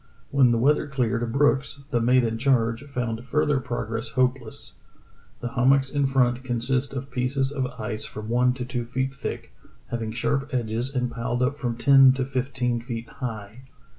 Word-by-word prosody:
When 135 -3 +5
the 120 - +2
weather 145 +5 +3
cleared 120 -4 -1
Brooks, 140 +1 +1
the 120 - +1
mate 125 +2 +4
in 115 -1 -1
charge, 115 -3 +2
found 125 -4 -3
further 145 +1 +1
prog 120 -3 -4
ress 115 0 -3
hopeless. 125 -1 -1 0.7
"The 120 - -3
hummocks 135 +1 +3
in 145 -2 +1
front 125 -2 +2
consist 130 +2 -1
of 135 +1 -5
pieces 130 +2 0
of 135 -3 -1
ice 110 0 -3
from 105 0 -6
one 125 +2 +2
to 125 -1 -4
two 125 -1 -3
feet 130 +3 -2
thick, - - -6 0.4
having 115 -2 -2
sharp 135 +5 -1
edges 120 +3 -2
and 125 -1 0
piled 120 +1 -1
up 135 +3 +1
from 120 -5 -3
ten 135 0 +7
to 130 -1 -1
fifteen 125 -2 -1
feet 115 -1 -6
high. 110 -2 -6
125 Hz, 175 wpm, -25 LUFS, 115-135 Hz, 0.7 s, ten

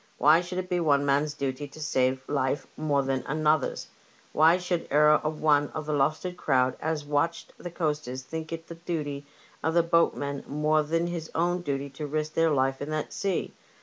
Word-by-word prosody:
Why 155 +5 +6
should 180 +1 -6
it 185 0 -2
be 180 -1 0
one 145 -4 +3
man's 145 +1 +1
duty 140 0 -3
to 145 - -14
save 130 -3 0
life 140 -1 0
more 145 -3 +1
than 135 -1 -1
another's? 155 -1 +1 0.5
Why 160 +3 +5
should 180 -2 -3
e'er 150 +1 +5
a 155 - +1
one 150 -2 +2
of 155 -1 -4
the 150 - -2
Lowestoft 155 +6 0
crowd 130 -5 +2
as 155 -1 -2
watched 165 +3 -1
the 175 - -6
coasters 150 -6 -3
think 160 +3 -6
it 165 0 -5
the 170 - -8
duty 150 -4 -4 0.3
of 160 +1 0
the 170 - +5
boatmen 145 -4 +1
more 150 +2 +2
than 165 +3 0
his 170 -2 -4
own 175 +2 +1
duty 140 -3 -3
to 150 +2 -6
risk 155 +1 -2
their 165 0 +3
life 135 -2 +1
in 145 - -4
that 155 0 -3
sea 195 -3 -2
150 Hz, 195 wpm, -27 LUFS, 140-165 Hz, 0.5 s, Why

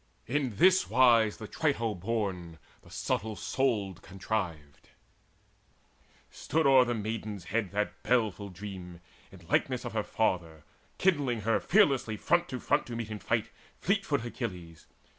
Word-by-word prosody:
In 130 -4 -1
this 185 - +4
wise 115 -3 +5
The 110 - -8
Trito 115 -7 0
born, 95 -4 -3 0.2
the - - -18
subtle 110 0 -2
souled, 105 -10 -1
contrived: 90 -7 -5 1.4
Stood 160 +1 -1
o'er 135 -2 +7
the 120 -1 -1
maiden's 110 -2 -4
head 100 +3 -1
that 105 +1 -2
baleful 110 -5 0
dream 90 -2 -8 0.3
In - - -15
likeness - - 0
of - - -5
her - - +1
father, 80 -4 -1 0.3
kindling 145 - +1
her 115 +2 +2
Fearlessly 135 - +3
front 175 +8 +1
to 130 -2 -4
front 145 +4 +1
to 120 - -5
meet 115 -2 -4
in 105 - -5
fight - - -1 0.3
Fleetfoot 180 - 0
Achilles. 90 -9 -6
110 Hz, 140 wpm, -30 LUFS, 95-130 Hz, 1.4 s, o'er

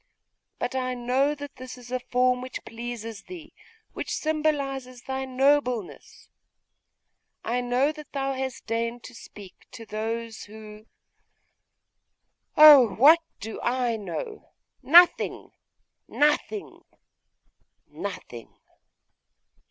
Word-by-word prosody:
But 245 - -3
I 255 -1 -2
know 255 +4 0
that 285 -1 -10
this 255 0 -9
is 245 0 -13
a 255 - -1
form 250 0 +1
which 255 0 -7
pleases 230 -2 -7
thee, 340 -4 -11 0.4
which - - -5
symbolises 275 -5 -2
thy 265 0 -4
nobleness! 260 -5 -1 1.2
T 245 +2 0
know 250 +4 +1
that 305 -1 -12
thou 275 -1 -2
hast 260 -1 -5
deigned 230 +1 -3
to 255 - -11
speak 200 -4 -14
to 225 - -10
those 225 +1 -5
who 215 +1 -12 1.7
Oh! 285 -8 +9
what 300 +8 +7 0.2
do 220 +1 -7
I 245 -1 0
know? 430 - -7 0.3
Nothing! 345 +4 +4 0.6
nothing! 300 +8 0 1.0
nothing! 155 - -8
250 Hz, 105 wpm, -26 LUFS, 230-280 Hz, 1.7 s, Oh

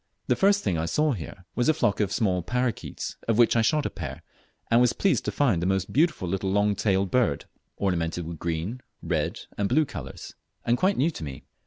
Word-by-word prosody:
The - - +2
first 200 +1 +3
thing 85 -4 0
I 80 - -1
saw 150 - +2
here 90 - -6
was 120 +4 +1
a 155 - +4
flock 100 -9 +1
of 100 -3 +1
small 95 -5 +1
parroquets, 125 +4 -3
of 115 -2 +2
which 120 -1 +5
I 115 - +4
shot 150 +6 +2
a - - 0
pair, - - -7 0.5
and 115 +1 +6
was 125 -1 +4
pleased 195 - +1
to - - 0
find 120 -13 +2
a 90 - 0
most 95 -1 0
beautiful 155 - +2
little 95 +2 -1
long 105 +1 +2
tailed 95 -2 +1
bird, 120 - +1 0.3
ornamented 85 -3 -1
with 80 -1 -7
green, 85 +9 -3 0.2
red, - - -1 0.2
and 100 -1 +1
blue 155 0 +3
colours, - - -8 0.3
and 120 - +3
quite 190 +9 +2
new 155 +6 +2
to 85 - -8
me. 70 -3 -7
105 Hz, 215 wpm, -26 LUFS, 90-125 Hz, 0.5 s, and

